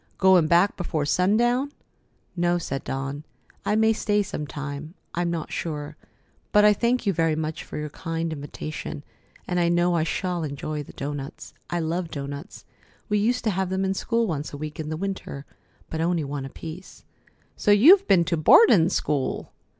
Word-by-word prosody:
Goin' 185 -4 +5
back 175 +5 +4
before 160 -4 -2
sundown?" 240 - +2 0.6
"No," 175 0 +2
said 135 -5 -4
Dawn; 135 +2 -4 0.4
"I 210 - +1
may 220 +1 +4
stay 210 -1 +1
some 150 -6 -5
time. 145 +4 -6 0.2
I'm 175 0 0
not 165 -2 -4
sure. 150 -2 -4 0.6
But 210 0 +6
I 210 - +7
thank 235 +3 0
you 200 - +2
very 165 -1 +1
much 155 0 -3
for - - -8
your 150 -1 -4
kind 165 +1 -3
invitation, 150 0 -6 0.4
and 180 0 0
I 170 -1 +3
know 175 0 +2
I 165 - +2
shall 175 +1 -2
enjoy 150 +1 -4
the 145 - -11
doughnuts. 140 +1 -6 0.2
I 175 0 -1
love 165 +2 -2
doughnuts. 140 +4 -7 0.4
We 210 0 +2
used 245 +4 +1
to 220 - +1
have 190 0 -1
them 190 +1 0
in 190 - +1
school 230 +4 0
once 155 -7 -3
a 145 - -7
week 150 +1 -6
in 155 -1 -4
the 155 - -3
winter, 190 -6 -5 0.5
but 160 - -2
only 170 -1 +1
one 140 -1 -4
apiece." 160 +6 -9 0.5
"So - - -1
you've 330 - +7
been 170 -3 +5
to 170 -1 0
boardin' 175 - +6
school!" 145 -7 -1
170 Hz, 180 wpm, -25 LUFS, 150-195 Hz, 0.6 s, I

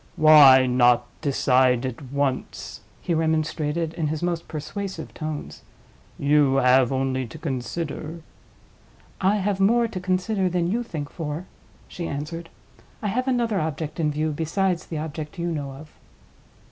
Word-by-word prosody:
"Why 145 -4 +8
not 125 -1 +4 0.2
decide 130 -3 +2
at 130 0 -5
once?" 140 -2 -3 0.2
he 170 - 0
remonstrated, 160 0 0
in 160 -2 -2
his 155 +2 -3
most 170 -1 -2
persuasive 160 +6 -6
tones. 150 - -6 0.6
"You 145 -1 +3
have 130 -1 +4
only 130 -1 -1
to 115 - -10
consider—" 155 +3 -4 1.0
"I 195 +2 +3
have 200 -1 -1
more 230 +4 +4
to 205 -5 -6
consider 185 +1 0
than 175 0 0
you 235 +3 0
think 155 -11 -6
for," 160 +1 -5 0.4
she 170 -2 -5
answered. 165 +4 -5 0.5
"I 210 - 0
have 255 +6 -1
another 235 -5 +1
object 155 0 -4
in 155 -2 +2
view 155 +1 -1
besides 170 +4 -1
the 160 - -4
object 150 0 -6
you 170 0 -2
know 145 -4 -4
of." 150 +3 -12
155 Hz, 145 wpm, -24 LUFS, 140-175 Hz, 1.0 s, Why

